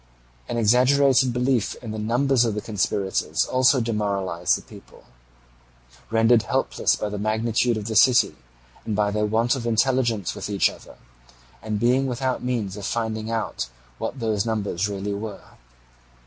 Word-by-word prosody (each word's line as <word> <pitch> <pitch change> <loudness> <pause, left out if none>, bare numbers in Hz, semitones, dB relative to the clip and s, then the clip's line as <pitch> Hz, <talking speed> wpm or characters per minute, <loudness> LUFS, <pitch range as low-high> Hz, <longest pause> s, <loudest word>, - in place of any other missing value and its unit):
An - - -2
exaggerated 130 +3 +4
belief 125 -2 0
in 115 - -8
the 110 - -5
numbers 120 +4 +2
of 115 -3 -1
the 105 - -3
conspirators 100 -2 -1
also 130 +1 +3
demoralized 100 -6 0
the - - -12
people, - - -15 1.1
rendered 115 +1 +4
helpless - - 0
by - - -3
the 105 0 -5
magnitude 110 +2 0
of 105 - -5
the 110 0 -4
city, 125 +3 +5 0.5
and 110 - -3
by 105 0 +1
their 105 0 0
want 115 +5 +1
of 120 -3 -4
intelligence 115 -4 +1
with - - -6
each 100 -2 +2
other, - - -14 0.7
and 105 -1 -3
being 125 +4 +2
without 130 +1 -2
means 115 -6 -2
of 100 - -6
finding 110 -1 -2
out 115 - -3 0.3
what 140 - -4
those 110 -4 0
numbers 105 -4 -2
really 100 0 -3
were. 105 0 -7
110 Hz, 155 wpm, -23 LUFS, 105-125 Hz, 1.1 s, city